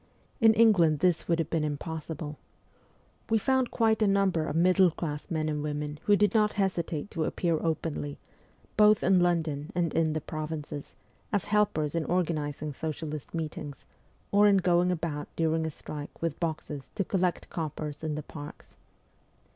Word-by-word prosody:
In 225 -1 +6
England 195 -9 +5
this 175 +2 +1
would 170 - +2
have 165 -2 -2
been 165 -2 +1
impossible. 155 0 -5 0.9
We 225 - +4
found 260 +3 +1
quite 220 -1 +2
a 215 - +4
number 195 -5 +2
of 145 - -3
middle 185 +2 +5
class 150 -2 -5
men 155 -2 -1
and 150 -1 -1
women 150 0 -3
who 205 - +5
did 205 +1 +3
not 210 -2 +3
hesitate 180 -4 -1
to 165 - -1
appear 165 0 0
openly, 155 -3 -2 0.6
both 210 0 +5
in 185 -1 +5
London 165 -4 0
and 170 -3 0
in 160 -1 +2
the 155 - -1
provinces, 155 -2 -6 0.4
as 205 -3 0
helpers 205 -8 +1
in 165 -2 -1
organizing 155 -4 -1
socialist 155 0 -5
meetings, 155 -3 -5 0.5
or 205 +1 +6
in 200 -1 +5
going 180 -1 +3
about 155 -4 -3
during 160 0 +1
a - - -1
strike 150 -1 -8
with 165 -3 -2
boxes 155 -4 -4
to 200 - +1
collect 180 -1 -1
coppers 155 -2 -4
in 155 -1 -2
the 150 - -4
parks. 145 -1 -10
165 Hz, 165 wpm, -29 LUFS, 150-185 Hz, 0.9 s, In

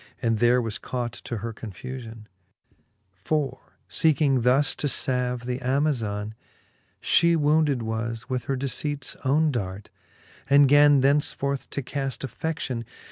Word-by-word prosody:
And 115 -3 0
there 120 +1 +4
was 110 -2 -3
caught 120 -2 -3
to 120 - -3
her 115 - -4
confufion; 115 +2 -8 1.0
For 140 -2 -2
feeking 145 -5 +2
thus 130 +4 +3
to 145 - -1
lalve 125 -2 -1
the 125 0 -2
Amazon, 125 -6 -1 0.7
She 170 0 +4
wounded 150 -4 +2
was 110 0 -4
with 125 -2 -3
her 135 - -1
deceipts 140 +2 -3
owne 150 +3 +3
dart, 100 -5 -5 0.6
And 140 0 +7
gan 145 0 +6
thenceforth 140 0 +1
to 140 - -3
caft 135 +1 -3
affe6i:ion. 135 -5 -3
130 Hz, 130 wpm, -25 LUFS, 115-145 Hz, 1.0 s, And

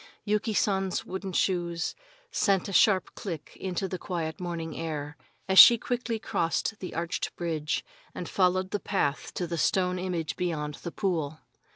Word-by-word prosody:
Yuki 210 +1 +1
San's 195 -3 0
wooden 190 +1 -5
shoes 175 -2 0 0.4
sent 195 - +2
a 200 - -5
sharp 190 0 +4
click 170 -7 -6
into 190 0 -2
the 185 -1 -5
quiet 165 -3 -3
morning 170 -3 -4
air 150 -2 -4 0.3
as 190 0 +6
she 235 - +11
quickly 240 0 -2
crossed 210 +1 -1
the 185 - -6
arched 165 +1 -2
bridge 160 -3 -2 0.3
and 175 - -5
followed 185 0 +1
the 205 - 0
path 145 -10 -1
to 180 - -1
the 170 -1 -3
stone 180 +1 +2
image 175 -4 -2
beyond 150 -4 -2
the 170 - -5
pool. 160 -7 -1
180 Hz, 160 wpm, -28 LUFS, 165-195 Hz, 0.4 s, she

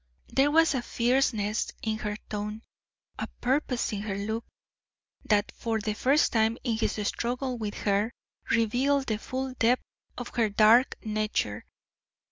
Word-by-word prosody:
There 275 +2 +4
was 325 +1 +4
a 260 - 0
fierceness 235 -4 +1
in 220 -1 -1
her 210 -2 -3
tone, 210 +1 -4 0.6
a - - -2
purpose 255 -1 0
in 200 - -2
her 205 -2 -3
look, 220 +3 -3 0.8
that 210 0 +2
for 225 -1 -2
the 215 0 -2
first 275 +7 +3
time 225 0 +2
in 235 -4 0
his - - +1
struggle 250 +2 -2
with 210 -2 -3
her 205 +2 +2 0.4
revealed 255 +5 +2
the 215 -3 -1
full 260 +2 -4
depth 240 +2 +3 0.3
of 245 - -5
her 230 -3 +1
dark 220 +5 +5
nature. 215 - -1
225 Hz, 145 wpm, -28 LUFS, 210-255 Hz, 0.8 s, dark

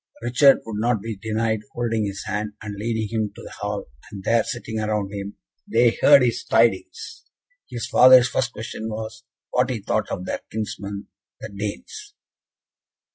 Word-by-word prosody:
Richard 130 +3 +5
would 105 -2 -5
not 120 -1 +2
be 110 +2 -5
denied 110 +1 -1
holding 115 -3 -1
his 100 0 -5
hand, 105 0 -3
and 105 -1 -6
leading 110 +1 -2
him 110 -1 -2
to - - -11
the - - -10
hall, - - -3 0.3
and 100 -3 -8
there, 115 +1 +3
sitting 115 -2 -5
around 105 -2 -2
him, 100 0 -6 0.3
they 115 +1 +5
heard 140 -3 +8
his 120 -1 0
tidings. 115 - 0 0.4
His 120 -1 -4
father's 125 0 +7
first 125 0 -1
question 110 0 -6
was, 110 0 -6 0.3
what - - +2
he - - -2
thought - - -1
of 90 - -4
their - - -3
kinsmen, 100 -2 -5 0.3
the 110 - -7
Danes? 105 - -7
110 Hz, 165 wpm, -23 LUFS, 105-120 Hz, 0.4 s, heard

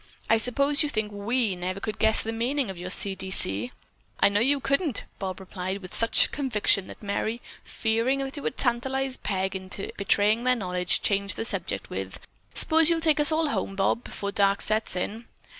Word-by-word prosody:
"I 225 - +5
suppose 280 +5 +2
you 300 - 0
think 215 -5 -2
we 210 +1 -1
never 185 +2 -4
could 215 +1 -5
guess 220 0 +4
the 225 - -3
meaning 240 +1 -1
of 190 - -11
your 180 +1 -6
'C. 195 +1 +6
D. 190 0 -6
C.'" 110 - 0 0.5
"I - - +5
know 200 +1 +1
you 275 +5 +2
couldn't," 275 - 0 0.2
Bob 190 -1 -5
replied 190 0 -5
with 185 - -10
such 230 - +4
conviction 215 -8 0
that - - -12
Merry, 215 +3 -2 0.2
fearing 230 +4 -1
it 270 +1 -4
would 265 - -4
tantalize 265 +2 -1
Peg 190 -1 -3
into 190 +1 -6
betraying 205 +3 +2
their 250 0 +3
knowledge, 180 -4 -1
changed 200 0 0
the 225 - -4
subject - - -3
with: - - -5 0.4
"S'pose 320 0 +6
you'll 335 -1 +2
take 315 -2 +2
us 295 +1 +7
all 315 -1 +1
home, 195 - -3
Bob, 195 +4 0
before 200 0 -5
dark 200 -1 +2
sets 215 -2 0
in." 215 +6 -4
220 Hz, 190 wpm, -26 LUFS, 195-265 Hz, 0.5 s, us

